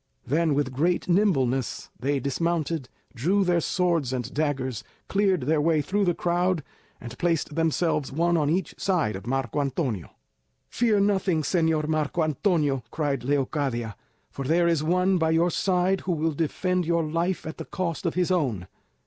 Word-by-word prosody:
Then, 155 +1 +1
with 140 -2 -1
great 170 +7 0
nimbleness, 135 - +1
they 140 +3 0
dismounted, 155 +1 -1 0.2
drew 180 +11 +1
their 175 -2 +2
swords 170 -7 0
and 125 -1 -4
daggers, 135 -6 -1 0.2
cleared 195 -4 +2
their 150 +4 +1
way 160 0 +2
through 205 +4 0
the 175 -2 +1
crowd, 175 -1 0 0.4
and 120 0 -8
placed 165 -3 0
themselves 160 -2 0
one 170 +4 +1
on 150 -3 +2
each 175 +1 0
side 165 - +1
of 95 +3 -8
Marco 135 +1 -1
Antonio. 130 - -2 0.6
"Fear 220 -4 +2
nothing, 190 -5 +1
Señor 160 -1 +1
Marco 155 +1 0
Antonio," 155 -3 +1
cried 140 -5 -2
Leocadia, 130 -5 -1 0.4
"for 140 - -5
there 170 +5 +2
is 165 -3 +1
one 180 +3 +2
by 160 -1 +2
your 165 +2 +3
side 185 +2 +1
who 185 - -1
will 160 0 0
defend 180 +4 0
your 170 0 +1
life 170 +4 -1
at 160 - -7
the - - -5
cost 175 -1 -3
of 165 - -2
his 180 0 +1
own." 130 - 0
160 Hz, 165 wpm, -26 LUFS, 140-175 Hz, 0.6 s, your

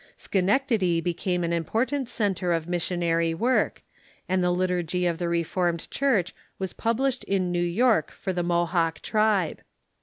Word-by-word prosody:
Sche 190 -2 -1
nectady 200 -5 +2
became 175 +1 -1
an 170 0 0
important 235 - -1
centre 190 -7 0
of 165 -1 -2
missionary 170 -1 0
w^ork, 245 +8 +1 0.4
and 185 0 +1
the 180 - +2
Liturgy 180 -1 0
of 170 -2 0
the 175 -1 -1
Reformed 170 0 -1
Church 225 -10 +1 0.2
was 190 -1 -4
published 255 +3 0
in 185 -2 0
New 175 0 0
York 220 +7 +2
for 190 - -4
the 175 - -1
Mohawk 170 -1 0
tribe. 215 -6 +1
180 Hz, 150 wpm, -26 LUFS, 170-210 Hz, 0.4 s, nectady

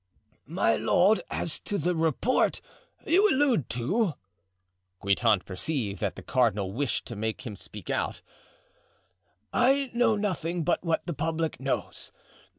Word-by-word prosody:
"My - - +2
lord, 205 +5 +3
as 165 - -2
to 205 - -3
the 175 +2 0
report 165 - +1 0.5
you 395 +5 +4
allude 260 - +2
to"—Guitant 95 - -2
perceived 100 - -3
that - - -2
the - - -10
cardinal 105 -6 +1
wished 130 +4 -1
to 120 - -7
make 110 +5 -3
him 110 -4 -5
speak - - -8
out—"I 110 - -3
know 235 -2 +3
nothing 180 -5 -2
but 175 +2 0
what 165 -2 0
the 170 - -3
public 160 +2 -2
knows. 135 0 -3
145 Hz, 125 wpm, -28 LUFS, -, 0.5 s, you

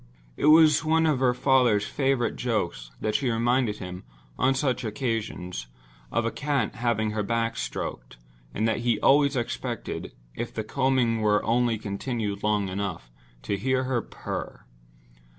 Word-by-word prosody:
It - - 0
was 155 -1 +7
one 160 +1 +3
of 150 -5 +2
her 125 -2 +3
father's 125 -6 +3
favorite 135 -3 0
jokes 85 - -2
that 110 - 0
she 130 +3 +1
reminded 120 -1 +1
him, 90 -1 -7 0.3
on 135 +1 +2
such 130 -2 0
occasions, 105 - -3 0.4
of 115 - 0
a 115 - 0
cat 145 -2 -1
having 115 -3 0
her 105 0 -1
back 115 +2 -1
stroked, - - -5 0.3
and 110 - 0
that 110 - 0
he 120 -2 +1
always 140 +3 +4
expected, 120 -2 -4 0.2
if 120 +1 -4
the 110 - -4
combing 125 -2 +1
were 105 -1 +3
only 120 -1 +2
continued 105 0 -3
long 105 -2 +1
enough, 95 -10 -4 0.3
to 100 - -1
hear 130 +4 +1
her 130 -2 0
purr. - - -7
115 Hz, 150 wpm, -26 LUFS, 105-130 Hz, 0.4 s, was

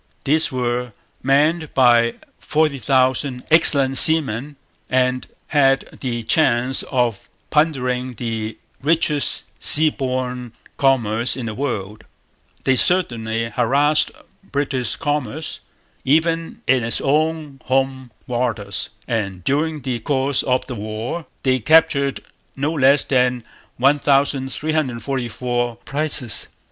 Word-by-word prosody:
These 155 +3 +1
were 125 -2 -2 0.3
manned 150 +4 +1
by 120 -2 +4 0.2
forty 150 -3 0
thousand 130 0 0
excellent 140 -5 +5
seamen 145 -3 +4 0.3
and 130 0 0 0.2
had 135 -2 +1
the 120 -3 -3
chance 125 0 +1
of 120 -6 -1 0.2
plundering 130 -5 0
the 110 -1 -4 0.2
richest 150 -1 +1 0.2
sea 155 +1 +6
borne 125 -3 -4 0.2
commerce 120 -3 +2
in 125 - -5
the 110 - -4
world. 105 -5 -4 0.6
They 130 -1 +2
certainly 115 -10 0
harassed 140 +6 +2 0.3
British 140 -7 -2
commerce, 145 0 -3 0.4
even 165 +3 0
in 130 -2 +2
its 115 - -1
own 150 -1 -1
home 130 -1 -1 0.2
waters; 115 -5 -3 0.2
and 100 -6 -3
during 150 - -1
the 125 -2 -3
course 135 +2 0
of 130 -1 0
the 130 - -6
war 110 +9 -5 0.2
they 130 -1 +2
captured 140 +1 +3 0.3
no 145 +4 -2
less 140 -1 +4
than 125 -2 +1 0.3
1344 135 -3 0
prizes. 145 -5 +1
130 Hz, 105 wpm, -20 LUFS, 120-145 Hz, 0.6 s, sea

